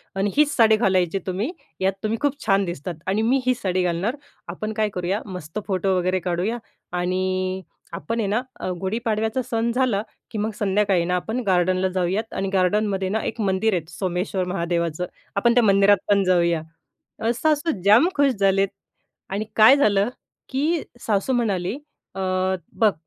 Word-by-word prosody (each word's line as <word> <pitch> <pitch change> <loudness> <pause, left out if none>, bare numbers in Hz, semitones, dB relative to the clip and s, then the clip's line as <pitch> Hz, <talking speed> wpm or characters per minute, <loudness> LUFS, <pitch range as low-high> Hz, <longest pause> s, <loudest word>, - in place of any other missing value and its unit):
आणि 195 +1 0
हीच 300 0 +3
साडी 220 -2 +6
घालायची 185 -4 +2
तुम्ही, 195 - -1 0.3
यात 190 +1 +2
तुम्ही 215 +1 0
खूप 290 0 0
छान 195 -2 +3
दिसतात. 170 0 -5
आणि 195 +3 +1
मी 245 +5 +3
ही 255 - +4
साडी 185 -5 -1
घालणार. 180 +8 0 0.3
आपण 215 +5 -4
काय 215 -1 0
करूया? 185 +4 -1
मस्त 180 -2 -6
फोटो 190 -1 +1
वगैरे 185 +1 +1
काढूया 180 +6 -1 0.4
आणि 185 +1 -1 0.3
आपण 230 +1 -3
आहे 215 - 0
ना 215 +4 +1 0.2
अ, - - -3
गुढीपाडव्याचा 220 +3 -1
सण 230 0 +1
झाला, 245 -5 +1 0.3
की 220 - -5
मग 215 +2 -1
संध्याकाळी 195 -3 +2
ना 180 +1 0
आपण 220 +7 -2
गार्डनला 185 0 +2
जाऊयात. 185 +4 -1
आणि 195 0 -2
गार्डनमध्ये 195 +1 +1
ना 220 +3 0
एक 225 - -3
मंदिर 200 +2 +1
आहे 175 - 0
सोमेश्वर 180 +1 -2
महादेवाचं, 170 -1 -1 0.3
आपण 235 +4 +3
त्या 245 0 +4
मंदिरात 200 0 +5
पण 200 -1 +4
जाऊया." 170 -3 +2 0.6
अ, 225 - +1
सासू 310 +1 +2
जाम 215 - +6
खुश 285 -1 +4
झालेत 195 -2 +2 0.6
आणि 200 +3 -2
काय 220 +5 +8
झालं, 205 -6 +3 0.4
की 300 +5 0 0.2
सासू 210 +3 0
म्हणाले, 205 -5 0 0.4
"अ, 195 - -5 0.5
बघ 210 +2 +3
195 Hz, 165 wpm, -23 LUFS, 185-220 Hz, 0.6 s, काय